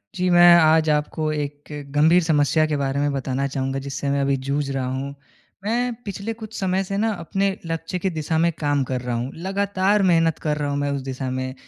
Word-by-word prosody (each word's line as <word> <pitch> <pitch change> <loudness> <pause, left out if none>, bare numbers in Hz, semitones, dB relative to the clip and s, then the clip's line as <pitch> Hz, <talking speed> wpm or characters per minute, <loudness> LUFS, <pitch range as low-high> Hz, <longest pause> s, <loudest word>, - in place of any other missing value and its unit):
जी, 180 0 0
मैं 175 0 +8
आज 160 0 +4
आपको 150 +1 -1
एक 145 -1 -4 0.3
गंभीर 160 +4 +5
समस्या 155 0 +2
के 150 -1 -1
बारे 140 0 -1
में 145 0 +1
बताना 135 0 -1
चाहूँगा 135 -1 -2
जिससे 140 0 -3
मैं 140 0 +1
अभी 140 0 +2
जूझ 140 0 -1
रहा 135 -1 -2
हूँ। 135 +2 -4 0.5
मैं 240 +3 0
पिछले 200 +2 -4
कुछ 220 -1 -10
समय 190 0 0
से 195 +1 -4
न 220 +2 +1
अपने 195 0 -1 0.2
लक्ष्य 165 +2 -3
के 190 - 0
दिशा 160 -1 -2
में 170 +1 +3
काम 145 -2 +1
कर 130 -1 -3
रहा 125 -1 -3
हूँ, 120 +3 -3
लगातार 195 +2 0
मेहनत 165 -3 +3
कर 150 -1 -1
रहा 145 -1 -2
हूँ 140 - -1
मैं 145 0 -1
उस 140 -1 -2
दिशा 130 0 -4
में। 130 0 -3
155 Hz, 215 wpm, -22 LUFS, 140-180 Hz, 0.5 s, मैं